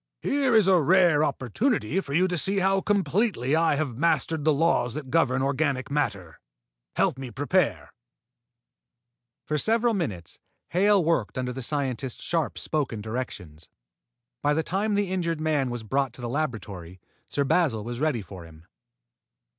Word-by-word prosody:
"Here 275 -4 +2
is 215 -4 +5
a 185 -3 +5
rare 170 -1 +4
opportunity 155 - 0
for 140 - -7
you 185 +3 +4
to 180 - -2
see 195 +5 +1
how 195 0 +2
completely 195 - +1
I 165 -2 +3
have 140 -5 -2
mastered 165 -1 +1
the 155 - +4
laws 145 -5 +1
that 140 -4 -6
govern 135 -5 +2
organic 140 -1 -1
matter. 100 - -2 0.6
Help 130 - +1
me 130 -2 -6
prepare." 145 - 0 1.5
For 150 0 -1
several 230 +4 +2
minutes, 105 - -4 0.3
Hale 195 +2 +3
worked 155 -11 0
under 125 -1 -2
the 130 - -6
scientist's 130 -2 -3
sharply 165 -3 -1
spoken 135 -8 -2
directions. 100 -9 -6 0.7
By 145 0 +2
the 160 - 0
time 200 +5 -1
the 200 -2 0
injured 170 -4 -1
man 150 -4 0
was 120 -2 -5
brought 135 +2 -1
to 125 - -12
the 120 - -3
laboratory, 110 - -4 0.3
Sir 140 - 0
Basil 135 -7 +1
was 120 +2 -5
ready 145 -8 0
for 95 -3 -10
him. 80 0 -16
145 Hz, 155 wpm, -26 LUFS, 125-175 Hz, 1.5 s, is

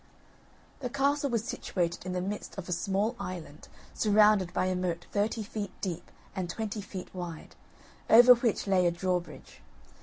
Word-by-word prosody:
The 250 - -3
castle 280 +2 +1
was 230 -3 0
situated 175 -5 -3
in 185 - -2
the 180 - -1
midst 205 +2 -5
of 195 - -6
a - - -5
small 200 +6 0
island 175 -6 -7 0.3
surrounded 210 -3 +4
by - - 0
a 185 0 0
moat 175 -1 -2
thirty 215 +2 0
feet 205 -1 -5
deep 180 -4 -4 0.3
and 185 -2 -3
twenty 215 +2 -4
feet 190 -2 -8
wide, 175 -3 -7 0.5
over 245 +2 +10
which 235 -3 0
lay 185 -3 +3
a - - +2
drawbridge. 180 0 -4
195 Hz, 160 wpm, -29 LUFS, 180-215 Hz, 0.5 s, over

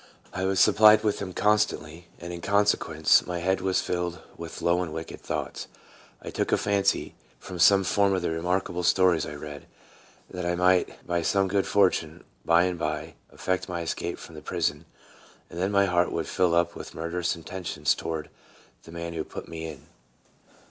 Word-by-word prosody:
I 95 +1 -2
was 95 -1 +1
supplied 110 +1 +6
with 105 -2 0
them 100 -2 -5
constantly, 90 -6 0
and, 85 0 -7
in 85 - -7
consequence, 100 -6 +3
my 90 -1 -3
head 95 +2 0
was 95 0 +1
filled 90 0 -2 0.2
with 85 -1 -8
low 85 +1 +3
and 85 -3 -4
wicked 80 +1 -7
thoughts. - - -4 0.6
I - - -6
took - - -2
a - - +4
fancy, 100 -1 0 0.2
from 90 - -9
some 95 +4 +6
of 100 -2 +2
the 85 - 0
remarkable 90 +2 -1
stories 90 -2 +3
I 75 - -7
read, 75 -1 -9 0.6
that 90 -1 -5
I 85 0 0
might 90 +1 +1
by 85 0 0
some 95 +3 +2
good 100 +1 0
fortune, 90 -4 +1 0.2
by 85 +1 +4
and 90 -1 -1
by, 75 -1 -3 0.2
effect 95 0 -2
my 85 -1 -3
escape 80 - -3
from - - -12
the - - -9
prison, 75 +3 -2 0.7
and 85 - -7
then 95 +2 +1
my 100 -1 +4
heart 90 -2 +1
would 80 - -2
fill 90 -2 +2
up 85 0 +2
with - - -9
mur 85 +1 -4
derous 90 0 -1
intentions 90 +2 -2
toward 80 -2 -5 0.5
the 80 - -12
man 85 0 -5
who 80 -1 -3
put - - -9
me 80 -1 -6
in. - - -10
90 Hz, 185 wpm, -26 LUFS, 85-95 Hz, 0.7 s, supplied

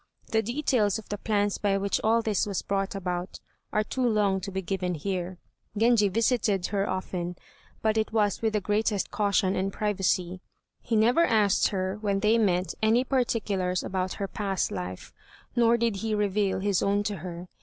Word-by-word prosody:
The 220 - +3
details 235 -3 +1
of 220 - -11
the 205 - -3
plans 205 -2 0
by 200 -1 +1
which 200 0 0
all 225 +1 +3
this 210 -2 0
was 200 -2 -2
brought 195 0 -1
about 180 -1 -4 0.3
are 215 - +1
too 260 - -4
long 210 -5 +2
to 195 - -5
be 190 0 -4
given 180 0 -2
here. 180 +2 -3 0.4
Genji 225 -2 +4
visited 220 -3 +1
her 200 0 0
often, 180 -1 -3 0.5
but 220 0 +2
it 215 - -1
was 210 -3 +1
with 220 -1 0
the 210 - +1
greatest 210 0 0
caution 200 -2 +1
and 190 +1 -1
privacy; 185 -3 -1 0.4
he 230 - -1
never 240 +9 +4
asked 210 - +3
her 190 +1 -2
when 200 -2 0
they 220 +2 +4
met 180 -4 +1
any 225 +3 +4
particulars 210 -8 0
about 185 -1 -2
her 200 - -4
past 195 -2 -2
life, 90 +1 -6 0.4
nor 235 0 +4
did 230 -3 0
he 220 +1 -1
reveal 205 -2 0
his 200 -2 +1
own 200 +1 +1
to 205 -1 -3
her. 175 +1 -7
205 Hz, 180 wpm, -27 LUFS, 190-220 Hz, 0.5 s, Genji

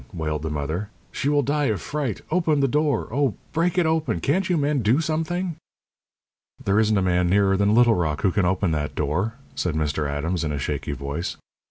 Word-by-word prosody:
wailed 75 -2 -3
the 80 - -3
mother. 75 +7 -3 0.2
"She 140 - -1
will 145 -1 +3
die 145 +2 +1
of 110 -6 0
fright! 145 -8 -3
Open 160 -4 +2
the 135 - +3
door! 150 +2 +1
Oh, 135 -5 +1 0.2
break 170 +2 +1
it 180 - +4
open! 160 0 0
Can't 175 +6 0
you 175 - +2
men 145 -1 +1
do 115 +7 +3
something?" 165 +2 -2 1.1
"There 100 +2 +3
isn't 110 -1 +3
a 95 - +2
man 90 -1 +2
nearer 100 0 +3
than 100 +2 +3
Little 120 -1 +6
Rock 80 -6 -1
who 95 - +3
can 100 0 +1
open 95 0 +1
that 75 -1 -2
door," 90 +10 -1 0.2
said 90 -4 -2
Mr. 75 -1 -1
Adams, 80 +4 -2
in 75 - -1
a 75 - -2
shaky 70 +1 -3
voice. 70 +5 -4
105 Hz, 205 wpm, -24 LUFS, -, 1.1 s, Little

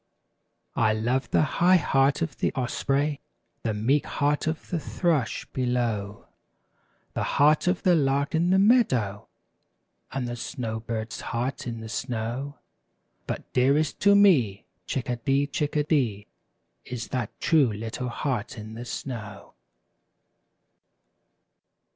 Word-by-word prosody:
I 110 -1 +3
love 120 +5 0
the - - +3 0.2
high 180 +2 +7
heart 135 -3 +2
of 155 -6 -4
the - - 0
osprey. 140 +3 0 0.4
The 110 -2 -1
meek 130 +8 +1
heart 145 +2 0
of 160 0 -3
the 175 - 0
thrush, 155 -6 -1
below. 120 -5 -1 0.9
The - - -2 0.2
heart 150 +4 +4
of 180 0 +1
the 180 - +5
lark 140 -1 +1
in 165 +2 +2
the 190 - +4
meadow. 165 - +3 0.8
And 130 -2 -2
the 120 - -4
snow 115 -2 -4
bird's 110 -1 -5
heart 125 +2 -3
in 115 -1 -5
the 110 - -7
snow; 120 +5 -4 0.7
But - - -5
dearest 140 +4 +2
to 200 0 +5
me. 140 - +4 0.2
Chickadee! 130 +2 0
Chickadee! 145 -8 0 0.6
Is 120 -2 -6
that 125 -5 -4
true 150 -8 +3
little 115 +4 -4
heart 130 0 -3
in 110 0 -8
the 120 +2 -7
snow. 110 -5 -7
130 Hz, 125 wpm, -26 LUFS, 115-150 Hz, 0.9 s, high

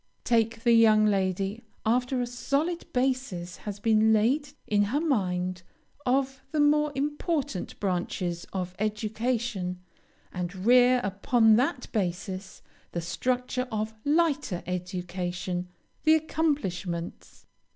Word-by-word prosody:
Take 230 -1 +1
the 235 - +5
young 215 -2 +6
lady 195 +1 0 0.2
after 250 +3 +1
a - - 0
solid 280 +8 -2
basis 250 -10 -1
has 205 -1 -6
been 220 0 +4
laid 250 +7 +2 0.2
in 205 -1 +2
her 255 +8 0
mind 185 - 0 0.5
of 265 +1 +1
the 310 - -2
more 300 0 +4
important 295 - -2
branches 180 -2 -2
of 180 -2 -3
education, 215 -3 -2 0.5
and 180 +1 -4
rear 250 +1 +6
upon 220 +3 +3
that 250 +1 0
basis 190 -1 -3 0.3
the 170 - -2
structure 250 +8 -1
of 215 0 -2
lighter 295 - +1
education 180 0 -3 0.3
the 315 0 +6
accomplishments. 195 - -2
220 Hz, 110 wpm, -27 LUFS, 185-255 Hz, 0.5 s, young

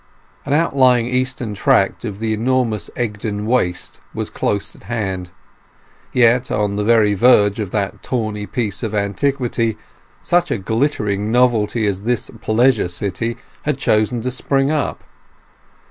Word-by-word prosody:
An 140 - 0
outlying 130 -6 +3
eastern 125 -2 -1
tract 95 0 +2
of 105 -4 -5
the 110 +1 -1
enormous 115 -4 0
Egdon 105 -2 -3
Waste 110 -7 -1
was - - -3
close 100 -1 -2
at - - -17
hand, 95 -6 -3 0.8
yet 125 +1 +3
on 105 -1 0
the 105 - -1
very 110 -2 +4
verge 105 -1 +4
of 105 -3 -3
that 100 -1 -2
tawny 110 -4 -3
piece 110 -5 -2
of 110 -3 -3
antiquity 115 +2 0 0.4
such 175 0 +1
a 140 - 0
glittering 105 -2 -1
novelty 115 -2 +2
as 100 -2 -1
this 120 +3 0
pleasure 115 -1 +2
city 100 +6 -3 0.2
had 150 -3 -1
chosen 110 +2 +1
to 125 +2 -2
spring 135 +2 +1
up. 155 -2 -2
115 Hz, 140 wpm, -19 LUFS, 105-125 Hz, 0.8 s, very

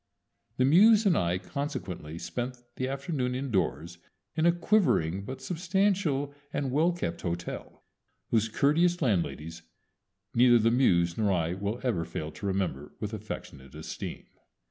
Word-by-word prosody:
The 130 - +3
Muse 210 +9 +6
and 190 -5 +4
I 85 +1 +1
consequently 90 - -5
spent 120 +10 -4 0.2
the 130 - -2
afternoon 135 -2 -2
indoors 85 - -2 0.4
in 160 +1 +3
a - - +7
quivering 165 - +2
but 130 +4 -7
substantial 180 -5 0 0.2
and 135 -2 -2
well 160 +6 +3
kept 165 - -4
hotel, 85 0 -5 0.5
whose 110 -1 +2
courteous 170 +9 +3
landladies 85 - -1 0.7
neither 120 0 +6
the 115 0 +3
Muse 85 -9 +3
nor 105 -2 +2
I 85 -2 0
will 100 +5 -3
ever 115 -10 0
fail 80 -1 -5
to 100 - -6
remember 90 -8 -2
with 105 0 -4
affectionate 75 -10 -8
esteem. 80 - -6
115 Hz, 140 wpm, -29 LUFS, 85-145 Hz, 0.7 s, a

